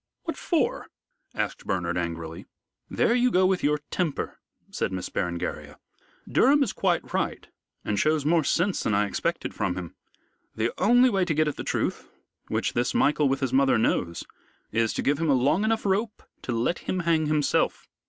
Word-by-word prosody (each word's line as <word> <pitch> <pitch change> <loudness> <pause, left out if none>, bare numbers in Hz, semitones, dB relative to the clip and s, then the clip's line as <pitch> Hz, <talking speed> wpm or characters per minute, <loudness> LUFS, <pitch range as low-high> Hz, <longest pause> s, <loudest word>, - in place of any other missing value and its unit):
"What - - -3
for?" - - -1 0.5
asked - - -3
Bernard, 90 -2 -1
angrily. 85 -2 -4 0.4
"There - - +2
you 250 +1 +3
go 185 -5 +3
with 185 -1 +1
your 150 +1 +3
temper," 170 -6 -2 0.3
said - - -2
Miss 95 -1 -4
Berengaria. 85 -1 -4 0.5
"Durham 280 +3 +4
is 235 - -2
quite 180 -3 -1
right - - -2 0.4
and 105 -1 0
shows 155 +1 +1
more 165 +1 +3
sense 180 +6 +1
than 110 - 0
I 105 0 +3
expected 100 - -2
from 90 - -1
him. 90 -3 -6 0.6
The 110 +2 0
only 245 +2 +5
way 195 -2 +2
to 160 -4 -1
get 155 0 +2
at 150 - -2
the - - -5
truth - - -2 0.4
which - - -1
this 120 +1 0
Michael 150 -1 +3
with 135 +1 -1
his 130 -2 -1
mother 135 -2 +4
knows 85 -6 0 0.5
is 115 0 +1
to - - -2
give 145 +1 +1
him 165 -2 0
a 140 - +5
long 140 +10 +2
enough 220 0 0
rope 210 +3 -1 0.2
to - - -4
let 120 +9 0
him 185 - -2
hang 165 -2 +1
himself. 150 -1 +1
150 Hz, 185 wpm, -26 LUFS, 110-185 Hz, 0.6 s, only